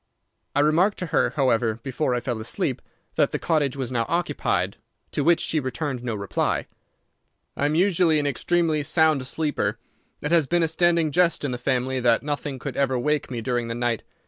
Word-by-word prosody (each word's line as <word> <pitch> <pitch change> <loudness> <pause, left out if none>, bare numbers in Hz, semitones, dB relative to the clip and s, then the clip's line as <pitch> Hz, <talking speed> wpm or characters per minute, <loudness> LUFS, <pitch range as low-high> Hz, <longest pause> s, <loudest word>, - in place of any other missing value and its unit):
I 145 - +4
remarked 170 +7 +3
to 180 - -3
her, - - +3
however, 120 -5 +2
before 130 +2 -2
I 120 - -1
fell 120 -2 -3
asleep, 110 +2 -2 0.4
that - - +4
the - - -1
cottage 145 -5 0
was 130 -2 -3
now 115 -2 0
occupied, 170 +1 0 0.3
to 145 - -1
which 170 +1 +4
she 160 - 0
returned 130 -1 -3
no 120 -3 -2
reply. 100 -1 -1 0.9
"I 145 - +1
am 150 - 0
usually 175 -3 +3
an 145 - 0
extremely 155 +3 +1
sound 155 -3 +2
sleeper. 150 +2 -1 0.4
It 150 - -2
has 165 -5 +4
been 175 +2 +2
a - - +3
standing 170 -1 +2
jest 170 -1 +2
in 140 - -1
the 125 - -4
family 130 +1 0
that 120 0 +3
nothing 145 -1 -3
could - - -6
ever 135 -2 +1
wake 150 +3 0
me 120 -3 -4
during 120 -1 -1
the 115 - -3
night. 120 -2 -1
145 Hz, 195 wpm, -24 LUFS, 125-160 Hz, 0.9 s, I